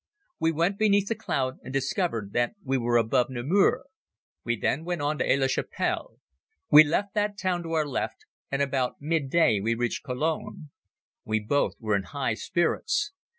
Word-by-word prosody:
We 165 - +2
went 170 +5 0
beneath 205 -2 +3
the 230 - 0
cloud 130 -8 -2
and 130 - -8
discovered 135 - -1
that 120 - 0
we 135 -1 -1
were 120 -1 +2
above 115 +2 +2
Namur. 155 - +2 0.6
We 120 0 -1
then 155 - 0
went 175 -3 -3
on 150 +1 -1
to - - +1
Aix 140 - +3
la 135 - +2
Chapelle. 135 - -2 0.5
We 150 +1 +11
left 190 +7 -1
that 210 -1 0
town 185 -2 -1
to 165 -1 -5
our 155 -2 +2
left 140 - -4 0.3
and 140 +1 +1
about 130 -2 -1
mid 150 -2 -1
day 145 -10 +3
we 115 +3 0
reached 120 0 -2
Cologne. 155 +4 -3 0.5
We 110 0 0
both 125 +7 0
were 110 -3 0
in 100 -1 -1
high 130 -5 0
spirits. 335 - 0
145 Hz, 180 wpm, -27 LUFS, 125-175 Hz, 0.6 s, We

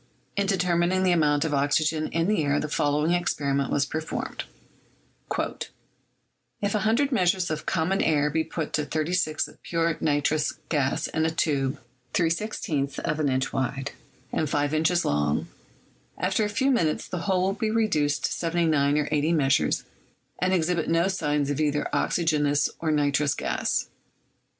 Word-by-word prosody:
In 200 0 0
determining 180 -1 +1
the 185 - +3
amount 150 -3 +3
of 155 - -1
oxygen 155 +2 +1
in 165 +1 0
the 210 -6 +2
air 145 0 +1
the - - -2
fol 145 -1 0
lowing 150 +3 +1
experiment 140 -6 0
was 140 - +2
performed: 155 +3 -4 2.1
"If 205 0 -1
100 225 +7 +2
measures 180 -6 +2
of 155 - -4
common 185 +3 +1
air 150 -2 +2
be 160 +1 +1
put 160 -1 -5
to 150 - +1
36 155 +1 0
of - - -17
pure 165 -1 0
nitrous 150 0 +1 0.2
gas 140 -4 0
in 160 - -1
a - - +1
tube 140 -4 0 0.4
3 170 -2 +3
/is 160 -7 -2
of 150 - -2
an 150 -2 +1
inch 130 0 -1
wide 135 +1 -2 0.4
and 155 - 0
5 145 +1 0
inches 160 +3 +2
long, 75 0 0 0.7
after 190 +5 +1
a 210 - 0
few 265 +7 +1
minutes 165 -12 +1
the 180 - -4
whole 185 +1 +1
will 190 +1 +1
be 215 +2 -2
reduced 195 -10 +1
to - - -1
79 160 -4 +1
or 150 -1 0
80 155 +2 +2
measures, 135 - +2 0.6
and 180 +2 +1
exhibit 175 -2 +1
no 165 +3 +2
signs 150 -6 0
of 145 +2 -1
either 150 -1 +1
oxygen 155 -4 +1
ous 145 0 +1
or 165 - -1
nitrous 145 -1 +2
gas. - - -1
155 Hz, 165 wpm, -26 LUFS, 145-180 Hz, 2.1 s, the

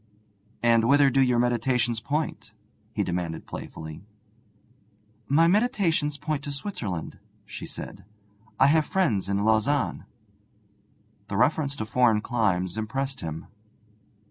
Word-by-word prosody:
'And 115 -1 +4
whither 140 +2 +5
do 135 - +3
your 125 -2 +3
meditations 120 -1 +1
point?' 145 -7 -3 0.4
he 110 -2 -1
demanded 85 -3 -3
playfully. 80 +2 -8 1.2
'My 160 +4 +4
meditations 175 -7 +1
point 150 -2 -2
to 145 - -4
Switzerland,' 120 - -5 0.3
she - - -8
said. - - -8 0.6
'I - - +7
have 155 +2 +4
friends 110 - +1
in 100 +1 0
Lausanne.' 110 +6 +1 1.2
The 100 - -3
reference 145 +1 +2
to 110 - -4
foreign 110 -1 +3
climes 105 -5 0
impressed 135 +5 -3
him. 80 -1 -5
120 Hz, 115 wpm, -26 LUFS, 105-145 Hz, 1.2 s, I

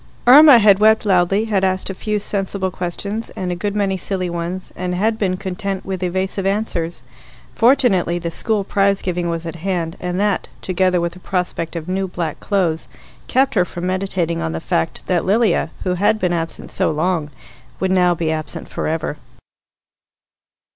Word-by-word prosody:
Irma 280 +2 +9
had 205 -3 +5
wept 220 +1 +4
loudly, 195 +2 +3
had 205 -4 0
asked 190 0 0
a - - -5
few 210 +3 -2
sensible 195 -2 -2
questions 200 +5 -4
and 180 -1 -3
a - - -1
good 205 +3 -3
many 195 -2 0
silly 185 -1 -3
ones, 175 +2 -4
and 180 0 -3
had 220 +4 0
been 185 -3 0
content 195 0 -4
with 190 -1 -4
evasive 190 +2 -1
answers. 195 -4 -2 0.5
Fortunately 230 -9 +3
the 170 -1 -4
school 215 +3 0
prize 195 0 +2
giving 175 -1 -1
was 165 0 -3
at 165 0 -5
hand, 170 -2 -2
and 180 +1 -3
that, 205 -1 0 0.2
together 185 -1 +1
with 170 0 -2
the 180 - -13
prospect 180 -3 -3
of 165 -1 -5
new 190 +1 -1
black 170 -4 -4
clothes, 180 -6 0 0.4
kept 265 +1 +2
her 185 - +3
from 175 0 -6
meditating 185 -3 -1
on 80 - -2
the 80 - -3
fact 80 0 -2
that 180 -2 +1
Lilia, 205 -4 +2
who 185 - 0
had 205 +4 +2
been 180 -4 0
absent 165 -1 -4
so - - +1
long, 160 0 0 0.5
would 190 0 0
now 180 -2 +3
be 160 -1 -1
absent 155 -2 -5
for - - -4
ever. 160 -1 -2
185 Hz, 180 wpm, -19 LUFS, 175-200 Hz, 0.5 s, Irma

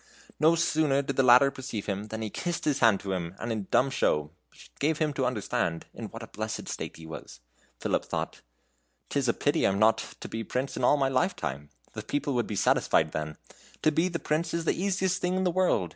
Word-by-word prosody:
No 160 +2 +5
sooner 155 -4 +2
did 140 -1 -3
the 135 - +4
latter 130 +2 +7
perceive 130 -7 -5
him, 100 0 -3
than 110 +1 -5
he 110 - -4
kissed 175 -1 -3
his 145 -2 +1
hand 110 -4 +5
to 95 - -4
him, 90 -1 -3
and 115 - -4
in 105 -4 -3
dumb 135 +2 +3
show 75 - +1 0.5
gave 150 +2 +1
him 155 -2 0
to 130 -2 0
understand 100 -8 -1
in 115 - -7
what 115 +2 -8
a - - -8
blessed 110 +1 -5
state - - -5
he 80 - -11
was. 80 -5 -9 0.4
Philip - - 0
thought: - - -4 0.7
"'T 145 - 0
is 135 - 0
a - - +4
pity 145 - +1
I - - +5
am 95 - 0
not 110 +2 +4 0.2
to - - -5
be 115 0 -4
prince 130 +5 -3
all 125 +4 +3
my 135 -1 +2
life 135 +8 +1
time. 70 +2 -5 0.2
The - - -5
people 145 -1 -2
would 120 -1 0
be 105 - -4
satisfied 80 -4 +3
then; 75 0 -4 0.5
to 155 - +5
be 165 +4 +2
a 175 -2 -2
prince 160 +1 -1
is 170 -1 -2
the - - +3
easiest 190 0 0
thing 180 +1 0
in 190 - +1
the 180 - +2
world. 175 - +2
130 Hz, 235 wpm, -28 LUFS, 105-155 Hz, 0.7 s, latter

